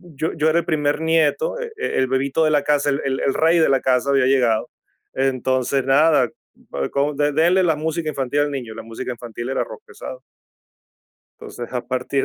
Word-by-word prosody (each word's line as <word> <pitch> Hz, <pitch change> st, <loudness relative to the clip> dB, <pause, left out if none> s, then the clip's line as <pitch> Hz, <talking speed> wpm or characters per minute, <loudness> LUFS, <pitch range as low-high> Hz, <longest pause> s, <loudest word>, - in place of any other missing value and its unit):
Yo 160 Hz, +4 st, -2 dB
yo 155 Hz, -1 st, +1 dB
era 165 Hz, +2 st, +3 dB
el 170 Hz, -, -4 dB
primer 150 Hz, -2 st, 0 dB
nieto, 165 Hz, -, +1 dB
eh, 475 Hz, -2 st, -5 dB
el 130 Hz, -, 0 dB
bebito 135 Hz, +4 st, 0 dB
de 155 Hz, -, +2 dB
la 145 Hz, -1 st, +2 dB
casa. 145 Hz, -1 st, +1 dB
El 140 Hz, -, -1 dB, 0.2 s
el 135 Hz, -, +1 dB
rey 165 Hz, +2 st, +3 dB
de 160 Hz, -, +4 dB
la 135 Hz, -1 st, +2 dB
casa 130 Hz, +1 st, +1 dB
había 135 Hz, -2 st, +3 dB
llegado. 125 Hz, -5 st, +2 dB, 0.4 s
Entonces, 130 Hz, 0 st, 0 dB
nada, 140 Hz, -1 st, +4 dB, 0.6 s
como, 140 Hz, +2 st, 0 dB
denle 160 Hz, +6 st, +3 dB
la 165 Hz, -3 st, +2 dB
música 160 Hz, +1 st, -2 dB
infantil 140 Hz, 0 st, -1 dB
al 145 Hz, 0 st, 0 dB
niño. 120 Hz, -5 st, -5 dB
La 115 Hz, -, -7 dB
música 115 Hz, +3 st, -6 dB
infantil 120 Hz, 0 st, -7 dB
era 135 Hz, -, 0 dB
rock -, -, -10 dB
pesado. 470 Hz, +2 st, -9 dB, 1.2 s
Entonces, 120 Hz, -, -8 dB
a 125 Hz, -, -1 dB
partir 130 Hz, +2 st, -1 dB
140 Hz, 185 wpm, -21 LUFS, 130-160 Hz, 1.2 s, de